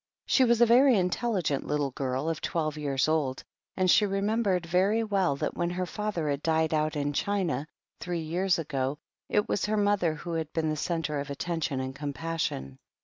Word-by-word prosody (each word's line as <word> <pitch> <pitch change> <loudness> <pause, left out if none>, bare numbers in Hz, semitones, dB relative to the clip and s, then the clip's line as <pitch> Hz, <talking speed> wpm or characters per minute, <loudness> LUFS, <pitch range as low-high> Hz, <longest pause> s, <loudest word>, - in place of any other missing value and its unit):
She 265 - +4
was 235 -1 +3
a - - +9
very 245 +1 +6
intelligent 180 - 0
little 145 -2 0
girl 130 +2 -2
of 165 -1 -2
twelve 155 -3 -1
years 140 -3 0
old, 150 -5 0 0.3
and 185 -1 +2
she 195 - +6
remembered 195 -2 0
very 190 +6 +2
well 195 -8 +1
that - - -3
when 170 0 0
her 180 +1 -2
father 200 -4 -3
had 140 -1 -1
died 160 0 +1
out 155 0 +1
in 145 0 -1
China, 170 -6 -1 0.3
three 175 -2 -3
years 175 +4 +1
ago, 140 -3 -2 0.3
it 210 - +2
was 205 - 0
her 215 +1 0
mother 205 -6 +2
who 170 +3 -6
had 160 -2 -2
been 160 -1 0
the - - -1
centre 155 -1 -2
of 140 0 -5
attention 150 -1 -2
and 130 0 -3
compassion. 145 - -3
165 Hz, 190 wpm, -28 LUFS, 145-195 Hz, 0.3 s, a